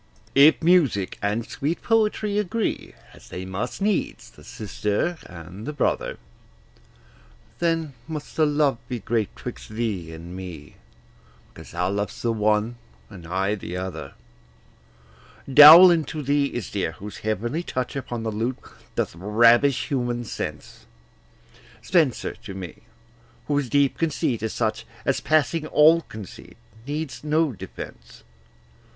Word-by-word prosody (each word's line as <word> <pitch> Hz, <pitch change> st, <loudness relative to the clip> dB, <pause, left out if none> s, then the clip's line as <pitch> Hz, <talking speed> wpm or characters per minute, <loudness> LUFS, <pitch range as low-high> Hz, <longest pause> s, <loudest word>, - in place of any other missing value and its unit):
If 145 Hz, +4 st, +6 dB
music 150 Hz, -, +2 dB
and 105 Hz, +3 st, -1 dB
sweet 150 Hz, +7 st, -3 dB
poetry 215 Hz, -2 st, +1 dB
agree, 210 Hz, +2 st, -2 dB, 0.2 s
As -, -, -16 dB
they 90 Hz, +1 st, -6 dB
must 95 Hz, -, -4 dB
needs, 205 Hz, -2 st, -1 dB
the -, -, -17 dB
sister 105 Hz, -, -2 dB
and 90 Hz, -, -10 dB
the 150 Hz, -, -3 dB
brother, -, -, -1 dB, 1.4 s
Then 165 Hz, -4 st, 0 dB
must 155 Hz, -2 st, -7 dB
the 155 Hz, -1 st, +3 dB
love 145 Hz, -4 st, +1 dB
be 125 Hz, -, -2 dB
great 110 Hz, -1 st, -1 dB
'twixt -, -, -8 dB
thee 110 Hz, -7 st, -3 dB
and 85 Hz, +2 st, -9 dB
me, 90 Hz, -6 st, -9 dB, 0.8 s
Because -, -, -12 dB
thou 90 Hz, +1 st, -1 dB
lovest 105 Hz, +3 st, -3 dB
the 115 Hz, -1 st, +1 dB
one, 110 Hz, +2 st, +1 dB, 0.3 s
and 90 Hz, -5 st, -11 dB
I 95 Hz, +4 st, 0 dB
the 90 Hz, -3 st, -5 dB
other. 90 Hz, -7 st, -6 dB, 1.3 s
Dowland 155 Hz, +3 st, +9 dB
to 155 Hz, -2 st, -5 dB
thee 140 Hz, +1 st, +2 dB
is 120 Hz, -6 st, -5 dB
dear, 95 Hz, -5 st, -2 dB
whose 100 Hz, +5 st, -9 dB
heavenly 115 Hz, -, -2 dB
touch 130 Hz, -7 st, -4 dB
Upon 120 Hz, -4 st, -4 dB
the 110 Hz, -, -2 dB
lute 115 Hz, +4 st, -2 dB, 0.4 s
doth -, -, -1 dB
ravish 115 Hz, -, +3 dB
human 120 Hz, -4 st, -1 dB
sense; -, -, -7 dB, 1.0 s
Spenser 160 Hz, -9 st, +1 dB
to 95 Hz, -, -8 dB
me, 90 Hz, -4 st, -7 dB, 0.7 s
whose 145 Hz, -3 st, -1 dB
deep 140 Hz, 0 st, +2 dB
conceit 140 Hz, -8 st, 0 dB
is 110 Hz, 0 st, -2 dB
such 110 Hz, -1 st, -2 dB, 0.2 s
As, 135 Hz, -, +1 dB
passing 155 Hz, +1 st, +1 dB
all 160 Hz, +3 st, +5 dB
conceit, 110 Hz, -, -11 dB, 0.3 s
needs 150 Hz, 0 st, -4 dB
no 155 Hz, 0 st, +1 dB
defence. 65 Hz, -, -10 dB
120 Hz, 135 wpm, -24 LUFS, 100-155 Hz, 1.4 s, Dowland